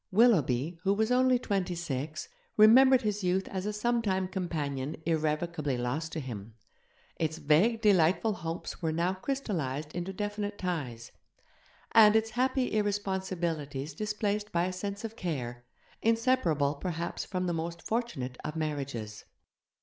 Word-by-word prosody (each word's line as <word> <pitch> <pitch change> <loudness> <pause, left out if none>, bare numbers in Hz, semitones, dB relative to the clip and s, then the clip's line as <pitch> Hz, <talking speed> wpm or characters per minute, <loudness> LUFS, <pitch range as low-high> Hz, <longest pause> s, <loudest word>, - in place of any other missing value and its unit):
Willoughby, 165 - +3
who 195 +2 +2
was 220 +3 +1
only 255 0 +4
twenty 195 -6 -1
six, 155 -2 -4 0.3
remembered 255 +4 +7
his 210 -2 -1
youth 185 +1 +1
as 190 +1 -3
a - - 0
sometime 210 -4 0
companion 150 -7 -3
irrevocably 155 -3 0
lost 135 +7 -2
to 160 - -2
him; 110 -5 -7 0.6
its 160 -1 -1
vague, 165 +10 +3
delightful 200 +1 +4
hopes 165 -1 -5
were 160 -2 0
now 170 +3 +1
crystallized 170 - -3
into 175 +2 -3
definite 205 +1 -3
ties, 140 - -4 0.8
and 215 -1 +7
its 220 0 +2
happy 255 +2 +1
irresponsibilities 185 -8 -2
displaced 210 +2 -2
by 170 0 +1
a 185 - -2
sense 200 +3 -5
of 225 0 -6
care, 125 - -4 0.4
inseparable 225 - +2
perhaps 170 +2 -4
from 185 -1 -3
the 175 - 0
most 170 +1 -4
fortunate 180 - -2
of 150 +1 -4
marriages. 140 -9 -4
180 Hz, 135 wpm, -30 LUFS, 150-210 Hz, 0.8 s, remembered